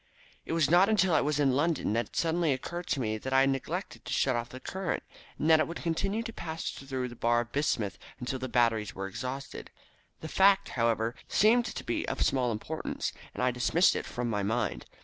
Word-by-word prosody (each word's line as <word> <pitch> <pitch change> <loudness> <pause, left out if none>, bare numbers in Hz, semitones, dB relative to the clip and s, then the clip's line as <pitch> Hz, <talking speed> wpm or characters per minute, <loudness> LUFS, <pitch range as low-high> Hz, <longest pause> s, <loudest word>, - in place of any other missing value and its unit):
"It - - -2
was 165 -3 +3
not 180 +6 +5
until 190 -5 +3
I - - +4
was 150 0 0
in 140 -2 +4
London 150 -6 +1
that 115 +2 0
it - - -19
suddenly 165 -2 +2
occurred 170 +7 -5
to 140 - 0
me 110 -3 -1
that 130 +4 -4
I 135 - +6
had 135 0 +4
neglected 165 +8 -4
to - - -7
shut 130 -2 +2
off 120 +1 -3
the 130 - -9
current, 190 +5 -3 0.3
and 155 - -1
that 160 -1 +7
it - - +2
would 170 - -6
continue 195 +6 -1
to 230 -1 -6
pass 160 -4 -4
through 130 -2 -4
the 120 - -10
bar 120 0 +2
of 120 0 -8
bismuth 110 -10 -1 0.2
until 130 +1 -3
the 130 0 -4
batteries 115 -4 +1
were 95 - -4
exhausted. 130 +7 -6 0.5
The 160 - -5
fact, 195 +3 +4
however, 115 -1 +1
seemed 235 +3 +4
to - - -5
be - - -2
of - - 0
small 125 -3 +1
importance, 130 +9 -4 0.2
and - - -2
I 125 - +3
dismissed 125 +9 +3
it - - -3
from 120 0 -3
my 105 -3 -1
mind. 110 +3 -1
135 Hz, 225 wpm, -30 LUFS, 120-170 Hz, 0.5 s, that